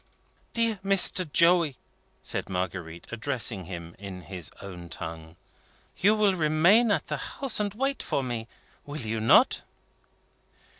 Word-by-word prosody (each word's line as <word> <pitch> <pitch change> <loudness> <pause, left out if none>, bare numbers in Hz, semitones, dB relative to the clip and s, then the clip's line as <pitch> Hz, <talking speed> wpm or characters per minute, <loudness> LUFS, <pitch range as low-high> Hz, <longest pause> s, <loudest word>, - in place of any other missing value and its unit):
"Dear 230 -3 +1
Mr. 185 -4 +3
Joey," 170 -4 +4 0.5
said - - -2
Marguerite, 90 -2 -4
addressing 115 -5 -1
him 85 -1 -8
in 95 -2 -8
his 90 -1 -4
own 90 -3 -9
tongue, 80 0 -7 0.6
"you 205 +3 +3
will 210 -2 +3
remain 175 +8 +4
at 205 - +1
the - - -3
house, 270 -6 -1
and 205 -1 0
wait 270 +4 -1
for 140 - -1
me; 120 -3 -4 0.4
will 145 +1 -7
you 110 -1 -2
not?" 110 - +5
125 Hz, 135 wpm, -27 LUFS, -, 0.6 s, not